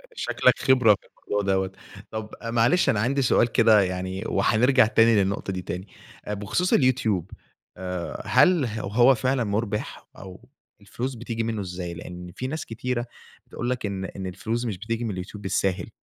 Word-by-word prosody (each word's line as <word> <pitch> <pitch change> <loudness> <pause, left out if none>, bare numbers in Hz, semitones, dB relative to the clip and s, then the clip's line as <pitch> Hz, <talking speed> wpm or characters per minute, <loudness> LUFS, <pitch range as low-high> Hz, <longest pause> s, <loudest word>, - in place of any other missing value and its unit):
شكلك - - +2
خبرة 125 -5 +5
في - - -24 0.2
الموضوع 100 -1 0
دوّة، 95 0 0 0.4
طب 110 -1 -5
معلش 115 +9 +2
أنا 105 - +2
عندي 135 +5 +1
سؤال 120 -1 +3
كده 110 -3 +5
يعني، 95 +1 -3
وهنرجع 120 +2 +4
تاني 115 +1 +4
للنقطة 100 -1 0
دي 95 - -4
تاني، 90 +2 -6 0.4
بخصوص 105 - -1
اليوتيوب 115 - +2 0.5
آآ، 90 -2 -5
هل 180 -7 +4
ه 110 -1 -4
هو 120 +6 +4
فعلًا 130 +2 0
مُربِح، 105 0 -3
أو 95 -1 -12 0.3
الفلوس 130 +1 -5
بتيجي 115 -1 -4
منه 110 -2 -2
إزاي؟ 90 -2 -5
لأن 90 +1 -9
في 130 - -4
ناس 155 +4 -4
كتيرة 120 +1 -3 0.5
تقول 120 - -3
لك 125 -3 -2
إن 95 -2 -3
إن 95 0 -6
الفلوس 115 +6 -3
مش 105 -5 -3
بتيجي 115 +3 -3
من 115 - -2
اليوتيوب 95 +2 -7
بالساهل، 95 -1 -1
110 Hz, 165 wpm, -25 LUFS, 95-120 Hz, 0.5 s, خبرة